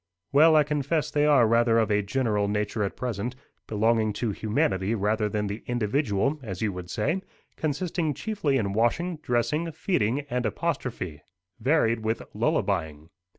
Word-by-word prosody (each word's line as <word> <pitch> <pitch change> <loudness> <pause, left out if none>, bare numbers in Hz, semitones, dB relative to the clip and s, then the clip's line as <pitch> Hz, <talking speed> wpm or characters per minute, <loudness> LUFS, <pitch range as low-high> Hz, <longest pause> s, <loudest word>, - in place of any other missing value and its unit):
"Well, 155 +3 +6
I 155 - +6
confess 150 +1 -1
they 150 0 +2
are 140 -5 +6
rather 115 0 +3
of 110 -1 +2
a 105 0 +3
general 105 -1 0
nature 105 +1 -1
at 100 - -3
present 120 0 -3 0.3
belonging 110 0 +2
to 110 +2 -1
humanity 100 0 0
rather 105 +1 0
than 105 0 -1
the 100 +2 -5
individual, 120 +3 0
as 95 -7 -6
you 105 -3 0
would 90 -1 -7
say 165 - -1 0.3
consisting 155 0 -1
chiefly 160 -7 -1
in 100 -5 -1
washing, 160 - +1
dressing, 150 +5 -1
feeding, 145 - 0
and 125 -4 -3
apostrophe, 110 - -3 0.4
varied 115 -3 +2
with 110 +1 -1
lullabying. 80 -5 -1
115 Hz, 150 wpm, -26 LUFS, 105-145 Hz, 0.4 s, Well